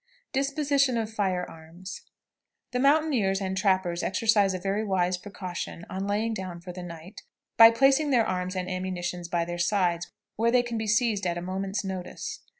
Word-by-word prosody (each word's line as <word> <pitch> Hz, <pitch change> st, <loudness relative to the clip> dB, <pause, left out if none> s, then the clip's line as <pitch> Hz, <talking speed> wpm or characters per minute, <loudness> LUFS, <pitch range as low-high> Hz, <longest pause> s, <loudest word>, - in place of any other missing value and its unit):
DISPOSITION 275 Hz, -1 st, +1 dB
OF 225 Hz, -1 st, -3 dB
FIRE 185 Hz, -4 st, 0 dB
ARMS. 165 Hz, +4 st, -10 dB, 0.7 s
The 250 Hz, -, -1 dB
mountaineers 275 Hz, -9 st, +3 dB
and 190 Hz, -1 st, -2 dB
trappers 185 Hz, -2 st, +1 dB
exercise 205 Hz, -1 st, +2 dB
a -, -, -1 dB
very 195 Hz, +3 st, -1 dB
wise 185 Hz, -3 st, +1 dB
precaution, 180 Hz, -3 st, -6 dB
on 190 Hz, +1 st, -3 dB
laying 215 Hz, +3 st, 0 dB
down 185 Hz, -4 st, -5 dB
for 180 Hz, +1 st, -8 dB
the 180 Hz, +1 st, -8 dB
night, 175 Hz, +2 st, -9 dB, 0.3 s
by 225 Hz, 0 st, +10 dB
placing 270 Hz, +5 st, +3 dB
their 240 Hz, -5 st, +4 dB
arms 185 Hz, 0 st, -2 dB
and 180 Hz, -1 st, -2 dB
ammunition 185 Hz, -1 st, -3 dB
by 170 Hz, -1 st, +1 dB
their 175 Hz, 0 st, -5 dB
sides, 175 Hz, -2 st, +1 dB, 0.3 s
where 230 Hz, +2 st, +3 dB
they 245 Hz, +1 st, +4 dB
can 235 Hz, -2 st, -3 dB
be 220 Hz, -, -3 dB
seized 215 Hz, -3 st, +2 dB
at 175 Hz, 0 st, -1 dB
a -, -, -3 dB
moment's 195 Hz, +3 st, -3 dB
notice. 190 Hz, -, -5 dB
195 Hz, 175 wpm, -27 LUFS, 180-225 Hz, 0.7 s, by